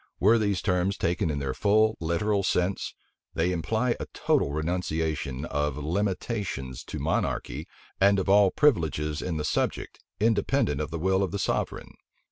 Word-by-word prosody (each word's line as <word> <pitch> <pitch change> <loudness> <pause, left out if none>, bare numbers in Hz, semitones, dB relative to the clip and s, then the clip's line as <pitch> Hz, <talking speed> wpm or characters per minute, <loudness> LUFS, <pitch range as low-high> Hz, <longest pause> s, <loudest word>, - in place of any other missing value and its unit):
Were 110 +4 +5
these 100 -3 0
terms 90 0 +1
taken 85 -1 0
in 75 - -1
their 70 -2 -2
full 110 +4 +3
literal 85 +5 0
sense, 95 0 -1 0.4
they 85 +3 +1
imply 110 +8 0
a - - -5
total 70 - +1
renunciation 80 -3 -2
of 75 -1 -1
limitations 90 - -2
to - - -6
monarchy, - - -2 0.3
and 100 +1 +5
of 95 - -1
all 100 0 +6
privileges 80 - +1
in 85 -3 -2
the 75 - -2
subject, 75 - -2 0.2
independent 105 - +1
of - - -3
the 80 - -4
will 95 +3 +1
of 95 - 0
the 100 - -3
sovereign. 95 - -2
90 Hz, 155 wpm, -27 LUFS, 75-100 Hz, 0.4 s, all